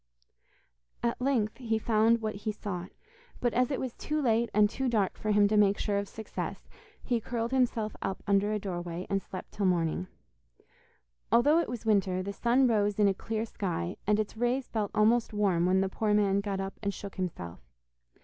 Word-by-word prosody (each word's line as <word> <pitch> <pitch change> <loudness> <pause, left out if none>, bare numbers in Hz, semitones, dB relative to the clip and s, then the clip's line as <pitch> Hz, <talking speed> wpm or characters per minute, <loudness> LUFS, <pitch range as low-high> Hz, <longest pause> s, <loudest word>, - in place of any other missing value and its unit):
At 235 +1 -1
length 245 -5 +1
he 225 -3 -1
found 225 +1 +2
what 215 0 -1
he 205 +2 -3
sought, 190 -3 -5 0.5
but 240 -1 0
as 250 0 +2
it 275 - -1
was 255 -3 -3
too 305 0 -3
late 235 -4 +2
and 210 0 +5
too 265 +4 -2
dark 210 -5 +1
for 215 - -4
him 205 -1 +5
to 215 - +1
make 205 -1 +4
sure 205 -1 0
of 200 - -5
success, 220 -1 -6 0.4
he 240 -3 0
curled 230 +1 -3
himself 240 -5 +1
up 190 - -3
under 200 +1 +2
a 215 - +1
doorway, 175 -3 -4
and 195 0 +1
slept 185 - -8
till 200 -2 0
morning. 175 0 0 1.2
Although 285 +8 +5
it 340 - -1
was 235 -2 -6
winter, 195 -4 +2
the 200 +1 -4
sun 245 +5 +3
rose 210 -4 +2
in 210 -1 +4
a 195 - +3
clear 220 +3 -3
sky, 180 -5 -3
and 210 0 +3
its 215 0 -2
rays 245 +3 0
felt 215 -3 -2
almost 225 +2 +3
warm 190 -5 +2
when 190 +1 +3
the 195 - +1
poor 210 +1 +1
man 200 -1 +3
got 200 -1 -3
up 195 0 -5
and 200 -2 -2
shook 200 -1 -8
himself. 95 - -4
210 Hz, 195 wpm, -29 LUFS, 195-230 Hz, 1.2 s, and